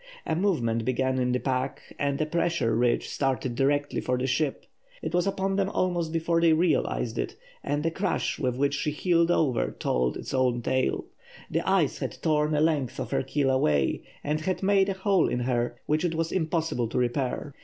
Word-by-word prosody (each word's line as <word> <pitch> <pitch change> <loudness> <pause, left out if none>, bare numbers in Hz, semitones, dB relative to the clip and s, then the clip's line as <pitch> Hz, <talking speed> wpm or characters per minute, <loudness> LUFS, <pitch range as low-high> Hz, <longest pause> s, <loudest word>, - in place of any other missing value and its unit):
A - - 0
movement 125 - +1
began 130 +2 0
in 125 0 +1
the 125 - +2
pack, 130 0 -3
and 140 -1 0
a 155 - +1
pressure 170 -6 0
ridge 120 +1 +1
started 130 -2 -1
directly 145 +3 +1
for 125 0 0
the 125 - -1
ship. 135 +2 -1 0.4
It 160 - -3
was 180 +2 +2
upon 195 0 0
them 195 -1 +1
almost 175 -5 0
before 165 +1 +1
they 165 -1 +5
realised 165 +1 +1
it, - - -3 0.3
and 145 +1 -1
the 165 - +1
crash 190 +2 -1
with 125 -4 -1
which 140 +1 +1
she 145 +1 -1
heeled 170 +2 +2
over 150 -7 +1
told 60 0 0
its - - -7
own 125 -2 +1
tale. 130 +2 0 0.5
The - - +1
ice - - +2
had - - -4
torn 150 -1 +1
a 150 - +2
length 150 -6 0
of - - -4
her - - +1
keel 135 0 0
away, 75 - +2 0.2
and 150 +1 -1
had 185 +4 -2
made 195 0 +3
a - - +1
hole 190 -1 +2
in 125 - -1
her 120 -1 0
which 155 +2 +1
it 170 -2 0
was 165 0 -1
impossible 160 -8 0
to - - -4
repair. 125 +3 -1
145 Hz, 200 wpm, -27 LUFS, 130-165 Hz, 0.5 s, they